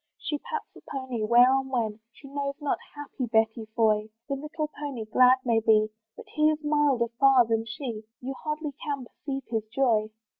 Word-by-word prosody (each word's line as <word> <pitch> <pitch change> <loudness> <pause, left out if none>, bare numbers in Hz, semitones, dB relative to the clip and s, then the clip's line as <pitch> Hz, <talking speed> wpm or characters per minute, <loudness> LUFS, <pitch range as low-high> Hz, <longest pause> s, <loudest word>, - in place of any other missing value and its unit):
She 295 - -3
pats 470 +4 -5
the - - -14
pony, 260 -5 -3
where 240 +4 +6
or 270 - +3
when 230 -5 -2
She 275 - -14
knows 280 0 -3
not, 295 -2 -1 0.2
happy 285 -3 -5
Betty 220 0 +1
Foy! 215 -2 +2 0.2
The 280 - -2
little 300 +2 -4
pony 285 -7 -6
glad 250 +4 +5
may 230 -2 +3
be, 215 -1 +3 0.3
But - - -10
he 305 0 +3
is 310 0 -2
milder 295 -5 +2
far 270 -3 +6
than 225 0 0
she, 230 -1 -5 0.2
You 265 +2 -5
hardly 300 -1 -3
can 280 -4 -3
perceive 270 +2 -6
his 225 -2 -1
joy. 225 -3 +2
260 Hz, 185 wpm, -27 LUFS, 225-285 Hz, 0.3 s, where